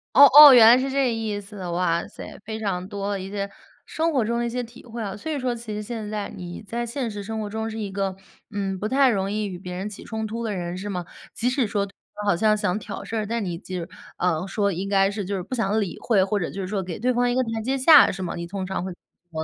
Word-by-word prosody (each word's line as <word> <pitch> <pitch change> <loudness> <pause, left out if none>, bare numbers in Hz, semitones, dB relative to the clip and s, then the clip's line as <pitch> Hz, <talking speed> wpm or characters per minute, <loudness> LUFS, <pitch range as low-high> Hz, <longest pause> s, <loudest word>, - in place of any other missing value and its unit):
哦 280 - +10
哦， 295 -1 +13
原 235 -3 +9
来 235 +2 +9
是 265 +1 -1
这 275 0 +1
个 - - +2
意 220 -2 -3
思。 200 -2 -9
哇 170 -1 0
塞， - - -10
非 220 0 -5
常 190 -4 -3
多 200 -1 -3
的 200 - -2
一 190 +1 -7
些 200 -1 -3 0.4
生 325 +1 -1
活 260 -6 +2
中 235 +2 -1
的 - - 0
一 - - -1
些 245 +2 -3
体 240 +1 -9
会 235 -1 -8
啊。 200 -2 -4
所 315 +10 -6
以 300 - -1
说 255 -2 -1
其 230 -2 -7
实 210 - -3
现 215 -1 -5
在 210 -1 -3
你 175 -1 -7
在 235 +4 -3
现 235 +1 -3
实 205 -2 -6
生 220 +2 -4
活 210 - -3
中 220 +1 -3
是 220 - -6
一 205 -3 -4
个， 195 -1 -2 0.3
嗯， 195 -2 -2
不 210 +3 -3
太 270 +2 +4
容 195 -4 0
易 210 0 -1
与 190 -3 -5
别 180 0 -8
人 190 +3 -4
起 210 - -10
冲 220 -1 -4
突 230 +2 -4
的 220 -2 -2
人 175 -2 -4
是 195 +3 -5
吗？ 180 -3 -4 0.3
即 240 - -1
使 255 0 +1
说 200 -2 -1
对 195 - -16 0.2
方 210 - -5
好 200 - +4
像 215 +3 +3
想 185 -3 0
挑 200 0 -7
事 - - -7
儿， 220 -1 0
但 230 +1 -2
你 175 -3 -3
就 185 +2 -7
是， 170 - -6 0.3
呃， 180 -2 0
说 200 0 0
应 190 +3 -4
该 195 -1 +3
是 205 -1 -4
就 200 +2 -3
是 185 - -4
不 255 - -5
想 220 -2 +1
理 195 -5 -3
会， 200 -5 +3
或 205 +1 -1
者 170 - -2
就 195 - -6
是 190 - -3
说 195 0 -2
给 180 -2 -6
对 250 +3 +1
方 245 0 +2
一 245 - -1
个 260 - +3
台 225 -1 -3
阶 265 +4 -1
下， 290 +2 +8
是 190 - -6
吗？ 180 - -3
你 170 0 -5
通 190 0 -4
常 190 -1 -3
会 190 - -4
怎 175 - -10 0.3
么 160 -1 -3
210 Hz, 325 characters per minute, -24 LUFS, 190-230 Hz, 0.4 s, 哦